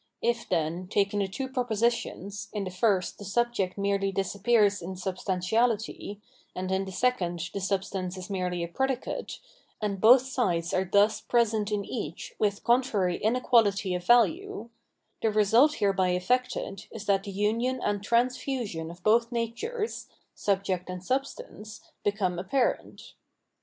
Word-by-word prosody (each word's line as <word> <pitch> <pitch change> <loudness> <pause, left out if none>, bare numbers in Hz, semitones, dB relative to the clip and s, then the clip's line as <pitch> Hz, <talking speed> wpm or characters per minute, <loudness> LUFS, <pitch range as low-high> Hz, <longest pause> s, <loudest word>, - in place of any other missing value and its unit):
If, 235 0 0
then, 170 +1 -1
taking 200 +1 +1
the 200 - +1
two 265 +8 -4
propositions, 235 -5 -1
in 210 -2 -2
the 185 - -5
first 185 -1 +1
the - - -8
subject 205 -2 0
merely 200 0 0
disappears 205 +2 +2
in 185 +2 -6
substantiality, 200 +4 -1 0.4
and 185 +1 -3
in 190 +1 0
the 190 - -7
second 185 -6 0
the 200 - -3
substance 190 -1 -2
is 185 - -7
merely 180 -3 -2
a - - -3
predicate, 265 +8 -2 0.4
and 200 -3 -2
both 245 +3 +8
sides 185 -11 -1
are 185 +1 +1
thus 205 +1 +4
present 220 -3 +1
in 205 -1 -1
each 180 - -5
with 205 -2 0
contrary 230 -7 +2
inequality 220 -4 +2
of 180 0 -3
value 280 - +2 0.2
— - - -49
the 225 - +2
result 225 +8 +4
hereby 190 -3 +2
efiected 245 0 -1
is 215 -2 -8
that 195 -1 +2
the 200 - -5
union 230 +6 0
and 205 -4 -1
transfusion 235 - -1
of 175 +1 -12
both 230 +2 +3
natures 415 - -3 0.3
[subject 190 -2 -1
and 180 0 -6
sub 270 +4 +1
stance] 225 - -10 0.2
become 195 -4 0
apparent. 245 +8 -1
205 Hz, 145 wpm, -28 LUFS, 185-235 Hz, 0.4 s, both